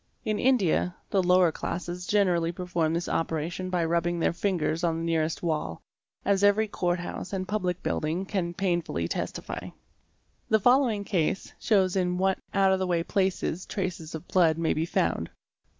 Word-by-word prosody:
In 215 -1 0
India, 195 -8 +2 0.2
the 195 - +3
lower 180 -1 +4
classes 175 +2 -5
generally 180 -5 +2
perform 175 -3 -1
this 170 - -2
operation 165 +3 -2
by 175 -2 +1
rubbing 170 +1 0
their 165 - +2
fingers 175 -3 -1
on 165 -2 +1
the 165 - -3
nearest 160 0 0
wall, 150 - -2 0.5
as 200 0 +2
every 205 +2 +4
court 175 -3 0
house 175 +1 -6
and 185 -1 -2
public 185 -3 -2
building 165 +5 -1
can 175 -3 -2
painfully 175 - -1
testify. - - -4 0.8
The 220 - +4
following 245 -2 +3
case 190 -2 -1
shows 190 -4 +2
in 180 -1 +1
what 190 +1 +1
out 195 -1 +3
of 190 - +1
the 185 - 0
way 170 -2 +1
places 190 -2 -1
traces 175 -5 -4
of 160 +2 -8
blood 165 -4 +3
may 165 -1 +1
be 160 +2 -1
found. 85 - 0
180 Hz, 165 wpm, -27 LUFS, 165-190 Hz, 0.8 s, lower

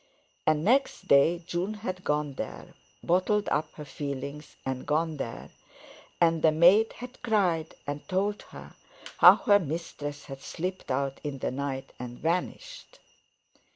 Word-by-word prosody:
And 155 0 +3
next 250 -4 +2
day 165 +5 +4
June 180 +6 -2
had 185 -4 -5
gone 150 -1 0
there—bottled 180 - -2
up 155 0 0
her 150 - -9
feelings 140 +1 -6
and 130 0 -4
gone 155 +1 0
there, 115 -4 -6 0.7
and 165 -2 +3
the 160 - +5
maid 180 +8 +5
had 250 +1 -10
cried 180 -8 +1
and 145 0 -5
told 200 +3 0
her - - -11 0.5
how - - +10
her 205 -3 +4
mistress 145 -3 -5
had 135 -1 -9
slipped 180 +6 -5
out 135 +1 -1
in 145 -2 -4
the - - -2
night 135 0 -4
and 120 0 -7
vanished. - - -3
160 Hz, 140 wpm, -28 LUFS, 140-185 Hz, 0.7 s, how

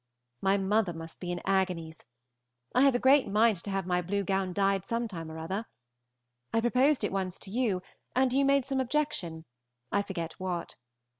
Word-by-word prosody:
My 195 +1 +3
mother 200 -1 +1
must 165 0 -9
be 175 -1 -4
in 175 - -3
agonies. 180 -5 -1 0.7
I 250 - +4
have 275 -2 +5
a - - +5
great 265 +2 +5
mind 215 +1 +3
to 170 - -7
have 195 -2 -1
my 180 0 +1
blue 200 +3 -1
gown 190 0 0
dyed 195 0 +1
some 235 0 -2
time 165 -6 -7
or 160 - -7
other. 190 +8 -4 0.8
I 225 - +2
proposed 255 +3 +3
it 205 - 0
once 190 -2 -2
to 190 - -6
you, 210 -6 0 0.3
and 255 0 +3
you 275 +1 +3
made 275 -1 +3
some 270 -1 -1
objection, 250 - -1 0.5
I 200 - +2
forget 175 -4 -5
what. 180 -2 -3
195 Hz, 190 wpm, -30 LUFS, 180-240 Hz, 0.8 s, have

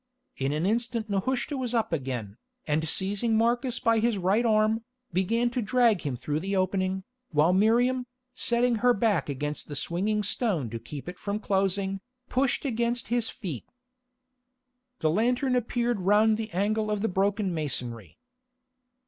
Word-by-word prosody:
In 135 +1 -1
an 155 +3 -1
instant 230 +1 -1
Nehushta 255 +8 -1
was 250 -2 -2
up 225 -6 0
again, 125 -8 -3 0.3
and 155 +1 0
seizing 205 +5 0
Marcus 240 +2 +1
by 230 -1 +3
his 230 -1 +1
right 195 +6 +2
arm, 215 +1 +2 0.3
began 230 +7 +1
to 250 - -1
drag 225 -2 +3
him 140 -4 -2
through 145 +5 -2
the 195 +4 -2
opening, 190 0 0 0.3
while 155 +2 +3
Miriam, 245 +5 +3 0.3
setting 240 -1 +2
her 245 +2 +4
back 205 - +1
against 145 +2 -4
the 145 - -6
swinging 205 +8 0
stone 190 - 0
to 115 - -4
keep 145 +5 -8
it 180 +1 -7
from 205 +1 -2
closing, 195 -1 0 0.3
pushed 270 +3 +1
against 235 -1 0
his 235 -1 +1
feet. 170 - -6 1.3
The 155 - +3
lantern 245 - +1
appeared 240 -1 0
round 210 +3 +4
the 220 0 -4
angle 215 +4 0
of 210 -1 -1
the - - +3
broken 195 0 0
masonry. 125 - -4
210 Hz, 155 wpm, -27 LUFS, 175-235 Hz, 1.3 s, her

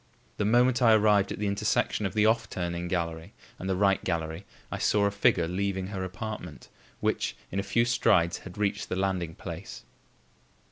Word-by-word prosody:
The 105 - 0
moment 120 +3 +3
I 115 -2 +6
arrived 105 -2 +3
at - - -4
the 105 - -2
intersection 100 0 0
of 95 - -9
the 105 0 +4
"off 110 +2 +2
turning" 85 -1 -3
gallery 85 -2 -3 0.2
and 95 - -4
the 95 - +1
"right" 95 0 +2
gallery, 80 +1 -3 0.3
I - - -3
saw 105 -1 +2
a 100 - +2
figure 90 -4 +2
leaving 95 +1 -2
her 95 -2 -4
apartment, 95 -3 -7 0.3
which, - - 0 0.2
in 95 - -1
a - - +2
few 115 +4 +1
strides 105 -8 +2
had 90 0 -11
reached 105 -1 -1
the - - -1
landing 95 -4 -1
place. - - -8
95 Hz, 185 wpm, -28 LUFS, 90-105 Hz, 0.3 s, I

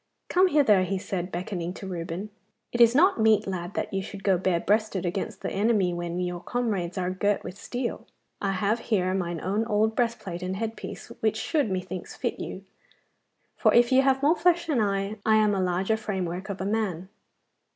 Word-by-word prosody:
'Come 370 +1 +5
hither,' 220 - +4
said 185 -2 -3
he, - - -11
beckoning 180 0 -4
to - - -8
Reuben. 180 +2 -5 0.4
'It 240 - 0
is 235 +1 +7
not 345 - +4
meet, 220 -1 +4
lad, 180 -1 -4
that - - -3
you 195 - 0
should 195 +1 -8
go 195 -2 +4
bare 180 -1 +1
breasted 205 -1 +1
against 185 +3 -3
the - - -2
enemy 200 -3 +2
when 175 0 -3
your 180 -1 -2
comrades 200 -5 -2
are 180 0 -1
girt 200 +2 0
with 185 - -7
steel. 240 +4 -4 0.3
I 195 -1 0
have 205 +4 +1
here 185 -6 0
mine 175 -3 -2
own 200 +4 0
old 220 +1 +2
breastplate 230 -7 -2
and 185 +1 -3
head 225 +2 -3
piece, - - -8
which 220 0 +1
should, 290 +1 0
methinks, 185 -1 -4
fit - - -3
you, - - -6 0.9
for - - +3
if 240 +1 +5
you 260 +1 +6
have 270 0 +2
more 305 +4 +5
flesh 345 -1 +2
than 290 -8 +1
I, 200 0 -1
I 220 - +4
am 215 -1 +4
a 195 - 0
larger 185 +4 +1
framework 190 -3 -3
of 200 - -4
a - - -2
man. 195 -4 -1
200 Hz, 200 wpm, -26 LUFS, 185-225 Hz, 0.9 s, is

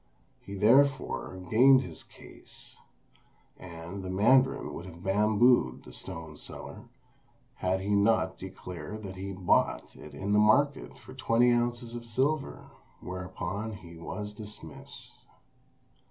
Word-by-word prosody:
He 100 - -9
therefore 130 -1 +3
gained 130 +4 +7
his 130 - -5
case, - - -14 0.8
and 85 +2 -8
the 95 - -6
mandarin 130 +8 +3
would 85 - -7
have 85 0 -12
bambooed 105 +5 +3
the 60 - -12
stone 80 +4 -8
seller, - - -9 0.7
had 95 +1 0
he 100 - -4
not 100 -2 +3
declared 95 +2 -8
that 95 -1 -7
he 95 +1 -5
bought 95 -2 +1
it 75 -2 -11
in 100 +7 -2
the 105 - +5
market 140 +7 +3
for 130 - -13
twenty 125 -2 +3
ounces 120 0 -1
of 120 -1 -7
silver, 135 +6 -1 0.3
whereupon 95 +3 -5
he 85 -4 -11
was 105 +5 -6
dismissed. 105 -1 -8
105 Hz, 125 wpm, -29 LUFS, 95-120 Hz, 0.8 s, gained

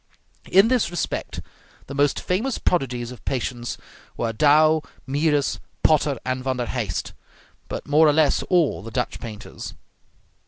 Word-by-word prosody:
In 195 +3 +7
this 250 -8 +2
respect 175 - -3 0.4
the 140 - -8
most 145 0 +2
famous 225 +8 -1
prodigies 125 -8 -1
of 125 - -12
patience 120 -2 -3 0.4
were 115 -1 -1
Dow, 155 +5 +5 0.2
Mieris, 145 +1 +1 0.2
Potter, 145 -3 +3
and 130 0 -2
Van 130 -1 -1
der 120 - -1
Heist, 110 -8 -3 0.5
but - - -6
more 155 +2 +5
or 150 - +5
less 155 -1 +3
all 175 - +2
the 115 - -8
Dutch 125 +2 -2
painters. 110 -3 -8
140 Hz, 145 wpm, -23 LUFS, 125-155 Hz, 0.5 s, In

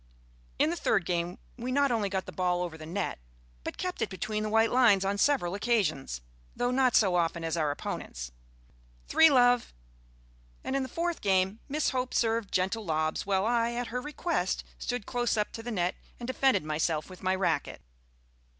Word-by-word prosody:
In 310 - +3
the - - -1
third 200 - +1
game 175 0 -1 0.2
we 245 +1 -4
not 280 0 +3
only 215 -4 +1
got 190 -1 -2
the - - -7
ball 180 -1 0
over 170 -2 -5
the 155 -1 -9
net 185 - -3 0.4
but - - -5
kept 365 -1 -3
it - - 0
between 215 +2 -3
the 215 - -2
white 225 +1 +3
lines 225 -6 +5
on 200 +1 0
several 245 -12 +2
occasions 200 - 0 0.3
though 245 0 0
not 255 -1 +3
so 190 -5 +4
often 170 -1 0
as 165 0 -1
our 155 -3 +1
opponents 60 - -5 0.8
(three, 320 0 +6
love); 245 - +4 0.9
and 265 - -2
in 275 - +1
the 260 - -4
fourth 340 +4 -2
game 190 +1 +2
Miss 300 +2 +1
Hope 255 -1 -2
served 225 -3 +1
gentle 190 +5 0
lobs, 155 -1 -1
while 195 0 +2
I, 235 0 +1
at 240 0 -3
her 250 +2 -3
request, 295 - -1 0.2
stood 245 -4 -3
close 240 -2 0
up 210 - 0
to 225 - -7
the 235 - -6
net 180 -5 0 0.3
and 240 - -5
defended 260 - +2
myself 155 0 -1
with 185 -1 -12
my 185 0 +1
racquet. 190 -1 -1
210 Hz, 190 wpm, -29 LUFS, 180-245 Hz, 0.9 s, three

